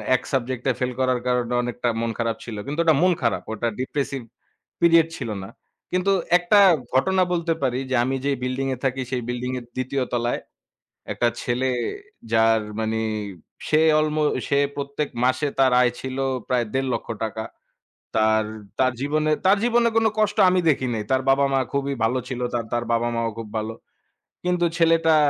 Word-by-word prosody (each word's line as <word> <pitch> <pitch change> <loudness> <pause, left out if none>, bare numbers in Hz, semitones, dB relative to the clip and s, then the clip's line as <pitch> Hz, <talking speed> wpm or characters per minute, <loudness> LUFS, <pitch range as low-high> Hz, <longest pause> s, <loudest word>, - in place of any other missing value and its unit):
১ 125 - -1
subject 130 -1 -1
এ - - 0
fail 125 0 0
করার 130 -1 +2
কারণে 125 -1 0
অনেকটা 120 0 -2
মন 115 0 -1
খারাপ 115 -1 0
ছিল। 115 -3 -6
কিন্তু 150 +4 -4
ওটা 160 -3 +4
মন 185 0 +5
খারাপ, 115 - 0
ওটা 120 +2 -2
ডিপ্রেসিভ 135 0 -2 0.6
পিরিয়ড 165 -1 +6
ছিল 115 - -5
না। 95 - -8 0.4
কিন্তু 185 +2 +1 0.3
একটা 180 +4 +4 0.3
ঘটনা 185 +8 +3
বলতে 170 -1 0
পারি, 125 +1 +1
যে - - +2
আমি 135 +2 -1
যে 140 - +2
বিল্ডিং 130 +1 -1
এ - - -15
থাকি। 130 0 0
সেই 125 -1 -1
বিল্ডিং 125 +1 -3
এর 120 - -13
২য় 130 +1 -1
তলায় 120 0 0 0.7
একটা 120 - +1
ছেলে 125 +2 0 0.6
যার 115 0 +4 0.2
মানে 110 0 -1 0.7
সে 155 0 +4 0.2
অল্ম 155 0 0 0.3
সে 140 - +2 0.2
প্রত্যেক 140 +1 -3 0.2
মাসে 130 +3 +2
তার 130 -2 +4
আয় 120 -1 +3
ছিল 130 0 -5 0.3
প্রায় 125 -2 +2
১.৫ 135 0 0
লক্ষ - - -5 0.2
টাকা। 110 0 -4 0.7
তার 110 0 +3 0.3
তার 130 -1 +3
জীবনে 155 +2 +1
তার 200 +2 +6
জীবনে 235 0 +3
কোন 225 - +3
কষ্ট 215 +1 +1
আমি 185 0 +2
দেখি 130 -3 +1
নাই। 110 - -2
তার 130 0 +3
বাবা-মা 135 0 +3
খুবই 140 0 0
ভালো 125 +3 +2
ছিল। 125 -1 -4
তার 115 -2 -1
তার 120 0 0
বাবা-মাও 115 0 0
খুব 115 -2 -6
ভালো। 110 +1 -3 0.7
কিন্তু 180 -1 +1
ছেলেটা 165 -1 +4
130 Hz, 175 wpm, -23 LUFS, 120-155 Hz, 0.7 s, পিরিয়ড